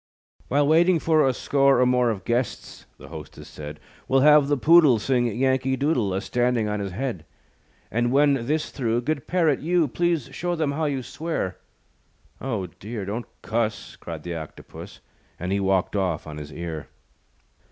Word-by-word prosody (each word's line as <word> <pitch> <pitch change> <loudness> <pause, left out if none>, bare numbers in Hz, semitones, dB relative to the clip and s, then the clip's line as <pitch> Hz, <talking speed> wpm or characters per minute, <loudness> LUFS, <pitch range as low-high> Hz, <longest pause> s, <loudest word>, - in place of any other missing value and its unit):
"While 145 +1 +2
waiting 170 +3 +4
for 155 -2 +3
A - - +3
score 135 0 +2
or 125 - +5
more 125 -1 +3
Of 100 -5 -4
guests," 120 0 -3
the - - -13
hostess - - -10
said, 75 0 -9 0.3
"We'll 135 0 +3
have 150 0 +6
the 145 0 +1
Poodle 155 -3 +6
Sing 120 +2 +1
Yankee 130 +3 +1
Doodle, 135 -8 +1
A 95 - -1
standing 120 -2 0
on 105 0 -2
his 100 -1 -4
head. 115 - -4 0.7
And 120 +2 +1
when 140 -3 +3
this 155 +2 -1
through, 120 -3 -1
Good 140 +1 -3
Parrot, 165 -6 +2
you, 170 0 +2
Please 170 -1 -1
show 175 0 -2
them 155 -3 0
how 155 +2 -1
you 140 -3 -2
swear." 140 - -4 0.8
"Oh, 115 -8 -2
dear; 100 +5 -7
don't 110 +5 -4 0.2
cuss," 110 0 -2
Cried 80 -3 -8
the 85 - -4
Octopus, 80 -5 -9 0.4
And 90 +2 -3
he 100 - +1
walked 95 0 +1
off 90 -5 -1
on 75 -1 -7
his 75 0 -8
ear. 80 -3 -6
125 Hz, 175 wpm, -24 LUFS, 100-145 Hz, 0.8 s, have